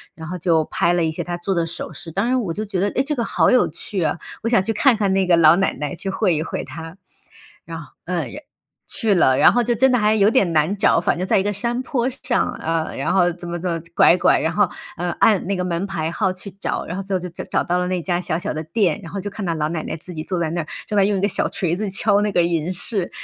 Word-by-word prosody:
然 160 Hz, -1 st, -9 dB
后 180 Hz, +1 st, -5 dB
就 160 Hz, -3 st, +2 dB
拍 170 Hz, +1 st, +1 dB
了 175 Hz, -1 st, +2 dB
一 160 Hz, -, 0 dB
些 -, -, -4 dB
她 175 Hz, 0 st, -4 dB
做 190 Hz, +3 st, -2 dB
的 170 Hz, -2 st, 0 dB
首 170 Hz, -, -5 dB
饰。 165 Hz, -, -8 dB
当 195 Hz, +6 st, -1 dB
然 255 Hz, 0 st, +1 dB
我 170 Hz, -6 st, -3 dB
就 215 Hz, +1 st, -3 dB
觉 190 Hz, -3 st, -3 dB
得， 200 Hz, -, +2 dB
诶， 265 Hz, -, 0 dB
这 300 Hz, +1 st, -2 dB
个 235 Hz, -, -1 dB
好 -, -, +2 dB
有 255 Hz, -, +4 dB
趣 185 Hz, +4 st, -4 dB
啊， 155 Hz, +1 st, 0 dB, 0.2 s
我 230 Hz, -, -1 dB
想 190 Hz, -6 st, +3 dB
去 225 Hz, -, -1 dB
看 240 Hz, +1 st, +4 dB
看 200 Hz, -3 st, +1 dB
那 190 Hz, -1 st, +1 dB
个 170 Hz, -2 st, +5 dB
老 160 Hz, 0 st, +7 dB
奶 195 Hz, -, +1 dB
奶、 150 Hz, +4 st, -4 dB
去 195 Hz, +3 st, -4 dB
会 185 Hz, -3 st, +1 dB
一 155 Hz, -, -1 dB
会 -, -, -4 dB
她。 165 Hz, +2 st, -9 dB, 0.7 s
然 165 Hz, -1 st, -7 dB
后， 150 Hz, -, -12 dB
呃， 175 Hz, -1 st, -1 dB
然 295 Hz, -, -9 dB, 0.4 s
去 220 Hz, -4 st, 0 dB
了， 130 Hz, -6 st, +4 dB
然 -, -, +6 dB
后 245 Hz, 0 st, +2 dB
就 240 Hz, +1 st, +1 dB
真 260 Hz, +3 st, +4 dB
的 -, -, +4 dB
还 215 Hz, 0 st, +3 dB
有 205 Hz, 0 st, +4 dB
点 200 Hz, -8 st, +2 dB
难 160 Hz, +5 st, +2 dB
找。 180 Hz, -, +3 dB
反 170 Hz, -, 0 dB
正 185 Hz, -, -1 dB
在 190 Hz, -, +3 dB
一 -, -, 0 dB
个 205 Hz, 0 st, -1 dB
山 235 Hz, +5 st, -2 dB
坡 260 Hz, -3 st, -1 dB
上， 250 Hz, -1 st, -1 dB
呃， 165 Hz, 0 st, -1 dB
然 135 Hz, -, -1 dB
后 175 Hz, -2 st, +3 dB
怎 175 Hz, 0 st, -9 dB
么 175 Hz, -, -3 dB
怎 175 Hz, 0 st, -2 dB
么 165 Hz, -1 st, -3 dB
拐 175 Hz, -, +6 dB
拐， -, -, +4 dB
然 160 Hz, -, 0 dB
后， 205 Hz, -, +2 dB, 0.3 s
呃， 175 Hz, +1 st, -2 dB
按 210 Hz, -6 st, +3 dB
那 200 Hz, -, 0 dB
个 180 Hz, -, -2 dB
门 180 Hz, +2 st, -2 dB
牌 165 Hz, -4 st, -3 dB
号 190 Hz, 0 st, 0 dB
去 185 Hz, +1 st, -9 dB
找， -, -, -2 dB
然 175 Hz, -, -5 dB
后 -, -, -2 dB
最 195 Hz, 0 st, -3 dB
后 -, -, +1 dB
就 180 Hz, -, -5 dB
角 170 Hz, -, -8 dB
找 -, -, +1 dB
到 175 Hz, +1 st, 0 dB
了 180 Hz, 0 st, 0 dB
那 180 Hz, -1 st, -1 dB
家 175 Hz, 0 st, -1 dB
小 160 Hz, -3 st, -2 dB
小 175 Hz, -, -3 dB
的 155 Hz, -, -3 dB
店。 195 Hz, +1 st, 0 dB
然 165 Hz, -, -10 dB
后 195 Hz, -1 st, -4 dB
就 205 Hz, -, -4 dB
看 200 Hz, -1 st, -6 dB
到 165 Hz, -1 st, -1 dB
老 155 Hz, 0 st, -1 dB
奶 160 Hz, -2 st, -3 dB
奶 -, -, -4 dB
自 180 Hz, +3 st, -7 dB
己 155 Hz, -, -5 dB
坐 180 Hz, 0 st, -3 dB
在 160 Hz, -2 st, 0 dB
那 170 Hz, -, -2 dB
儿， 155 Hz, -, -9 dB, 0.2 s
正 210 Hz, -, -2 dB
在 195 Hz, -, +5 dB
用 205 Hz, -1 st, +1 dB
一 -, -, -2 dB
个 205 Hz, -, +2 dB
小 -, -, +1 dB
锤 175 Hz, -2 st, -1 dB
子 210 Hz, -1 st, -2 dB
敲 205 Hz, +1 st, +2 dB
那 210 Hz, -1 st, 0 dB
个 175 Hz, -, +3 dB
银 170 Hz, +1 st, 0 dB
饰。 190 Hz, 0 st, -1 dB
180 Hz, 325 characters per minute, -21 LUFS, 170-205 Hz, 0.7 s, 老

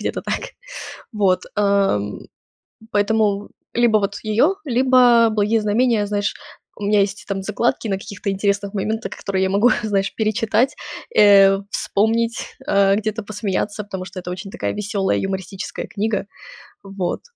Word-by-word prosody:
где-то -, -, -3 dB
так. -, -, -4 dB, 0.6 s
Вот. 195 Hz, -4 st, +2 dB
Э, 200 Hz, -, +3 dB, 0.9 s
поэтому 205 Hz, -1 st, +1 dB, 0.2 s
либо 235 Hz, -2 st, +4 dB
вот 200 Hz, 0 st, -2 dB
её, 235 Hz, -, +2 dB
либо 250 Hz, -3 st, +5 dB
"Благие 215 Hz, +1 st, +1 dB
знамения". 215 Hz, 0 st, +2 dB
Знаешь, 205 Hz, 0 st, -1 dB, 0.4 s
у 205 Hz, -, -6 dB
меня 210 Hz, 0 st, +3 dB
есть 200 Hz, +1 st, -1 dB
там 195 Hz, -1 st, -2 dB
закладки 215 Hz, +3 st, -1 dB
на 195 Hz, -1 st, -1 dB
каких-то 200 Hz, 0 st, -5 dB
интересных 200 Hz, +1 st, -1 dB
моментах, 220 Hz, +3 st, -2 dB
которые 190 Hz, -1 st, -2 dB
я 190 Hz, -, 0 dB
могу, 205 Hz, +5 st, +4 dB
знаешь, 200 Hz, -3 st, -1 dB
перечитать, 225 Hz, +4 st, +1 dB, 0.4 s
э, 195 Hz, -1 st, +7 dB
вспомнить, 230 Hz, +4 st, -1 dB
э, 200 Hz, 0 st, +3 dB
где-то 215 Hz, +1 st, -2 dB
посмеяться, 205 Hz, 0 st, -3 dB
потому 190 Hz, -2 st, -6 dB
что 185 Hz, +1 st, -9 dB
это 180 Hz, 0 st, -7 dB
очень 190 Hz, +2 st, -6 dB
такая -, -, -3 dB
весёлая 205 Hz, -2 st, -1 dB
юмористическая 190 Hz, 0 st, -4 dB
книга. 215 Hz, 0 st, -2 dB, 0.6 s
Вот. 195 Hz, -3 st, -3 dB
205 Hz, 140 wpm, -20 LUFS, 195-220 Hz, 0.9 s, э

